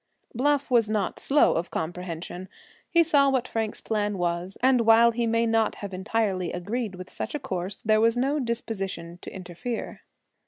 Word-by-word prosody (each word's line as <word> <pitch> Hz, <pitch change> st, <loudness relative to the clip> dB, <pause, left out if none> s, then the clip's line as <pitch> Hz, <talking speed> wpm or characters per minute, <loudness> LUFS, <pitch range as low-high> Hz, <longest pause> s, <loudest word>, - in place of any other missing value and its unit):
Bluff 285 Hz, +2 st, +1 dB
was 230 Hz, -3 st, +4 dB
not 210 Hz, -4 st, -1 dB
slow 290 Hz, +2 st, +4 dB
of 170 Hz, +2 st, -2 dB
comprehension. 175 Hz, +2 st, -5 dB, 0.4 s
He 335 Hz, -1 st, +5 dB
saw 285 Hz, -4 st, +4 dB
what 255 Hz, -2 st, 0 dB
Frank's 220 Hz, -1 st, -3 dB
plan 210 Hz, -2 st, -1 dB
was, 175 Hz, +1 st, -2 dB
and 260 Hz, -2 st, +5 dB
while 230 Hz, +1 st, +6 dB
he 235 Hz, 0 st, -1 dB
may 230 Hz, +1 st, +2 dB
not 225 Hz, -1 st, +2 dB
have 200 Hz, -2 st, -7 dB
entirely 190 Hz, -2 st, -1 dB
agreed 205 Hz, +3 st, -3 dB
with 185 Hz, 0 st, -10 dB
such -, -, -4 dB
a -, -, -2 dB
course, 185 Hz, -1 st, -4 dB
there 215 Hz, 0 st, +3 dB
was 230 Hz, +1 st, +3 dB
no 275 Hz, +4 st, +1 dB
disposition 195 Hz, -8 st, -4 dB
to -, -, -8 dB
interfere. 190 Hz, +6 st, -6 dB
220 Hz, 170 wpm, -26 LUFS, 185-240 Hz, 0.4 s, while